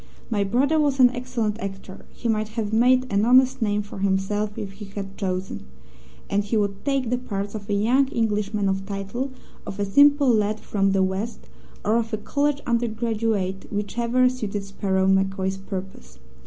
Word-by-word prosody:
My 205 -2 +2
brother 270 +10 +2
was 285 -3 +1
an 250 -1 +7
excellent 245 -4 -2
actor 195 -2 -8
(he 240 - -5
might 215 -1 +1
have 215 -1 -2
made 250 +3 +4
an 200 +1 +3
honest 255 +2 +4
name 210 -1 +1
for 205 -1 -9
himself 200 +2 0
if 200 -2 -5
he 205 +2 -10
had 195 0 -7
chosen), 185 - -4 0.6
and 205 +1 +1
he 205 +3 -1
would 200 -1 -1
take 270 -4 0
the 250 - +1
parts 200 -4 -4
of 210 -2 -7
a 205 - +1
young 245 +7 +3
Englishman 210 -4 0
of 195 0 -1
title, 205 +7 -4 0.3
of 200 - -7
a 200 - +1
simple 285 +6 +5
lad 215 0 +1
from 195 -2 0
the 195 -1 +3
West, 190 +5 -3 0.4
or 215 +2 +3
of 230 -1 -1
a - - +1
college 285 +6 0
undergraduate, 225 -4 -1
whichever 235 +4 +1
suited 215 -5 -3
Sparrow 195 -1 -1
MacCoy's 190 0 +1
purpose. 190 - -8
210 Hz, 175 wpm, -24 LUFS, 195-240 Hz, 0.6 s, an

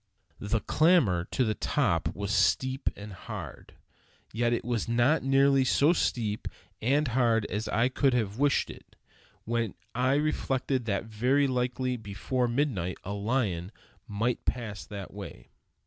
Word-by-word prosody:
The 105 +2 -1
clamber 140 - +3
to 130 - 0
the 110 -3 +1
top - - 0
was 100 -1 -3
steep 115 +9 +2
and 105 0 -9
hard. 95 - -8 0.6
Yet 120 +2 +1
it 120 - -1
was 120 -2 -1
not 120 +6 +3
nearly 135 0 +4
so 145 +5 +4
steep 110 -10 -1 0.3
and 140 +5 +2
hard 115 -3 +2
as 105 +2 -2
I 115 +3 +2
could 130 0 +2
have 110 -1 -1
wished 145 -1 +2
it, - - -16 0.5
when 115 -3 -1 0.2
I 130 +3 +2
reflected 135 -4 0
that 100 -1 -1
very 125 +6 +2
likely 125 0 -1
before 110 +4 -2
midnight 120 - -1
a 100 - -4
lion 100 -4 -1 0.4
might 115 +3 -1
pass 110 -5 -3
that 100 -4 -8
way. 100 -1 -9
120 Hz, 145 wpm, -28 LUFS, 105-130 Hz, 0.6 s, nearly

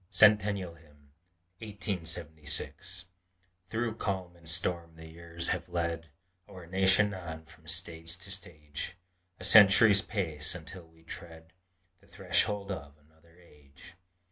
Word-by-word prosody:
CENTENNIAL 105 -4 +4
HYMN 75 -3 -23 0.5
1876 90 -3 -3 0.6
Through 115 0 -2
calm 95 -4 -3
and 85 -2 -5
storm 85 -1 +2
the 80 0 -12
years 85 +1 -4
have - - -2
led 85 -1 -2 0.4
Our 90 -2 -11
nation 95 +3 +3
on, 80 -4 -7
from - - -18
stage 80 +1 -2
to 95 +1 -11
stage 85 -3 -7 0.4
A - - -9
century's 100 +1 +8
space 85 -8 -2
until 90 +1 -10
we 80 0 -23
tread 80 0 -11 0.5
The - - -24
threshold 100 +2 0
of 70 -5 -7
another 80 +3 -26
age. 75 0 -18
85 Hz, 120 wpm, -31 LUFS, 80-95 Hz, 0.6 s, century's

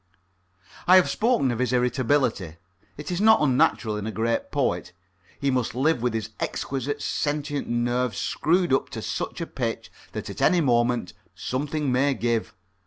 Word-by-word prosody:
I 185 - +8
have 185 - +5
spoken 220 - +2
of 120 - -3
his 125 -2 0
irritability. 125 - +1 0.4
It 150 +3 -6
is 175 +2 -1
not 220 +1 +6
unnatural 125 -5 +2
in 105 +1 -4
a - - -2
great 115 +1 -1
poet. 90 - -1 0.5
He 140 -1 +1
must 125 -3 -1
live 135 0 +1
with 120 -2 0
his 110 0 -3
exquisite 140 +2 -3
sentient 145 -1 -2
nerves 120 -1 0
screwed 175 -1 +1
up 135 - +1
to - - -6
such - - -4
a - - -1
pitch - - -4 0.2
that - - -5
at - - -7
any 180 - +4
moment 120 - +1 0.2
something 145 +2 -2
may 135 +2 +2
give. 115 -2 -1
130 Hz, 165 wpm, -25 LUFS, 120-145 Hz, 0.5 s, I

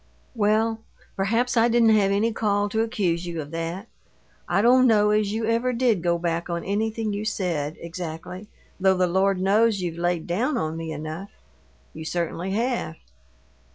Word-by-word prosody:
"Well, 220 0 +1 0.3
perhaps 230 +6 0
I 230 0 +5
didn't 235 -1 +4
have 210 -3 +4
any 210 +3 +1
call 205 -2 0
to 220 +2 0
accuse 180 -7 -1
you 170 -1 -4
of 145 -1 -6
that. 165 +5 -4 0.6
I 200 - +2
don't 255 +2 +6
know 210 -2 +4
as 210 -1 +1
you 220 +1 -2
ever 230 +3 +1
did 235 -6 +2
go 170 0 +1
back 170 0 -2
on 170 -1 -2
anything 215 +2 -1
you 205 +1 -3
said, 170 -8 -2
exactly, 170 +3 -7 0.3
though 190 0 +3
the 180 - +3
Lord 190 +2 +1
knows 205 +3 +3
you've 170 -2 -4
laid 175 -1 0
down 240 - 0
on 160 -7 -2
me 165 -1 -5
enough. 155 +5 -6 0.6
You 160 - -8
certainly 170 +2 -3
have!" 235 -6 -1
200 Hz, 170 wpm, -24 LUFS, 170-225 Hz, 0.6 s, don't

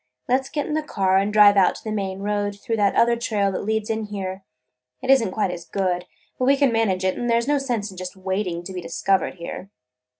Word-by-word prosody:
Let 260 +2 +2
's 265 - -11
get 295 -2 -2
in - - -3
the 310 - +1
car 190 -10 +1
and 200 +2 +1
drive 205 -1 +7
out 190 - +4
to - - -11
the 220 - -4
main 195 -2 -3
road 205 0 -2
through 225 0 -2
that 205 -2 +2
other 235 0 +4
trail 210 -4 0
that 185 - -3
leads 220 0 -1
in 220 -1 -2
here. 195 -2 -5 0.6
It 265 - +1
is 270 -3 +6
n't 195 - -2
quite 195 -2 0
as 175 - -6
good, 180 -2 -1 0.3
but 255 - +1
we 275 +2 +4
can 275 -3 +3
manage 200 -5 +1
it, 185 - 0
and 240 - -2
there 230 0 +4
's 235 - -4
no 290 0 +2
sense 235 -7 -2
in 185 - -13
just 185 +1 -6
waiting 190 -2 -3
to 190 - -7
be 180 - -4
discovered 180 +3 0
here." 180 +2 -7
205 Hz, 260 wpm, -23 LUFS, 190-230 Hz, 0.6 s, drive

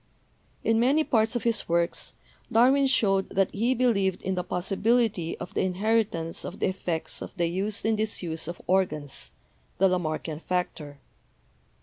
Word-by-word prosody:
In 225 0 +3
many 275 +6 +3
parts 225 -4 +2
of 240 - -1
his 230 -6 0
works 170 0 0 0.4
Darwin 265 +4 +5
showed 195 -7 +2
that 195 -1 +1
he 235 +5 +1
believed 200 -7 +1
in 190 - -1
the 180 -1 -1
possibility 195 0 0
of 185 - -8
the - - 0
inheritance 190 -3 0
of 190 - -6
the - - 0
effects 175 -3 -3
of - - -6
the 175 - +2
use 195 +6 -2
and 220 0 +2
disuse 175 -7 -2
of 175 - -6
organs, 155 -7 -1 0.5
the 195 - +5
Lamarckian 160 -3 -2
factor. 165 -5 -3
190 Hz, 150 wpm, -27 LUFS, 170-225 Hz, 0.5 s, Darwin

